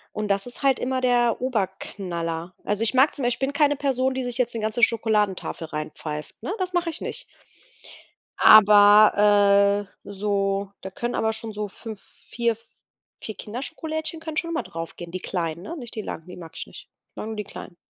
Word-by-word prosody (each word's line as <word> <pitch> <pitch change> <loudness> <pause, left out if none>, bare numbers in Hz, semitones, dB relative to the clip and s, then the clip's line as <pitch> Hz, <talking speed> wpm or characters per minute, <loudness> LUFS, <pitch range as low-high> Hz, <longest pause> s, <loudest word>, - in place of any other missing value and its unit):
Und 215 0 -2
das 200 0 +1
ist 245 -1 -10
halt 270 -2 +3
immer 260 +1 -1
der 240 -2 +3
Oberknaller. 185 -7 -3
Also 210 +2 0
ich 230 - +1
mag 265 +3 +4
zum 280 - -4
Beisp 245 - +2
ich - - -24
bin 270 +1 -1
keine 290 0 +3
Person, 265 -2 +1
die 260 -1 -3
sich 245 -1 -3
jetzt 245 -2 0
'ne 225 - -3
ganze 220 +2 -1
Schokoladentafel 210 -7 +1
reinpfeift, 150 0 -6
ne? 380 - -2
Das 365 -1 -2
mache 350 -1 +1
ich 325 - -6
nicht. - - -5 1.1
Aber, 205 -1 +7 0.2
äh - - -9
so, 200 -1 -1
da 190 - -6
können 240 +5 -3
aber 220 0 +1
schon 220 0 -5
so 210 0 -3
5, 215 0 -8
4, 235 +2 -3 0.7
4 215 - -6
Kinderschokolädchen 315 +8 -5
können 320 -1 -6
schon 335 - 0
immer 330 0 -1
drauf 165 0 -7
gehen, 175 -1 -9
die 185 - -4
kleinen, 170 -3 -3
ne? 335 - -6
Nicht 240 -5 -9
die 220 - -3
langen, 160 - -7
die 180 - -10
mag 165 -2 -10
ich - - -6
nicht. - - -13 0.2
Ich - - -57
mag 215 - -5
nur 220 - -5
die 210 - -3
kleinen. 190 -2 -10
215 Hz, 200 wpm, -24 LUFS, 195-255 Hz, 1.1 s, Aber